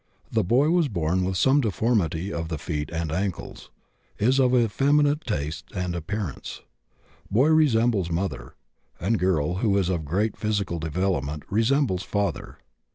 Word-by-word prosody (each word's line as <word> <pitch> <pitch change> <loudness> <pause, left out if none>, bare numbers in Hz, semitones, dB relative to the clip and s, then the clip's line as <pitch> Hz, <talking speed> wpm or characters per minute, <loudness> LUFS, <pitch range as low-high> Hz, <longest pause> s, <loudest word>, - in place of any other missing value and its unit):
The - - +2
boy 130 - +3
was 175 -3 +3
born 90 - 0
with 95 0 -1
some 130 - +4
deformity 100 - 0
of 85 -1 -3
the 80 -1 -3
feet 75 -1 -4
and 85 -2 -3
ankles; 95 +2 -4 0.5
is 130 +6 +2
of 130 -1 +4
effeminate 145 +6 +2
tastes 75 - -4
and 90 -1 -2
appearance. 85 -1 -5 0.7
Boy 130 +9 +3
resembles 120 - +3
mother, 85 -8 -3 0.4
and 105 +5 0
girl, 90 -2 +1
who 100 -1 +2
is 95 -2 +1
of 85 -4 -1
great 100 +9 -1
physical 105 -5 -2
development, 80 -2 -2
resembles 115 -2 +2
father. 100 0 -3
95 Hz, 145 wpm, -25 LUFS, 85-120 Hz, 0.7 s, some